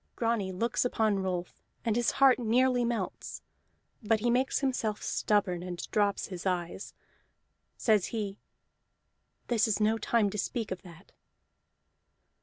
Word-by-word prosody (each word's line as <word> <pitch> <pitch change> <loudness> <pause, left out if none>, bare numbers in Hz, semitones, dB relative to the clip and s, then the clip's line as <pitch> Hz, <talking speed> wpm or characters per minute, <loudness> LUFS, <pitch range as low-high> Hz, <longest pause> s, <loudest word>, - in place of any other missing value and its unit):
Grani 225 -5 0
looks 225 +6 0
upon 220 -4 +1
Rolf, 180 -2 -3 0.2
and 225 -2 +1
his 240 -1 +1
heart 270 -2 +5
nearly 245 +2 +3
melts: 235 -5 -3 0.6
but 220 0 +2
he 240 +2 +1
makes 255 +2 +2
himself 250 -6 -1
stubborn 195 -4 +1
and 180 -1 -5
drops 205 -1 +1
his 180 -2 -6
eyes. 180 0 -3 0.8
Says 215 -5 +3
he: 210 -3 -4 1.1
"This 230 -3 +2
is 215 -1 0
no 220 +1 +2
time 215 -2 +2
to 210 - -4
speak 225 +1 -2
of 185 -1 -4
that." 180 0 -15
215 Hz, 135 wpm, -30 LUFS, 190-235 Hz, 1.1 s, heart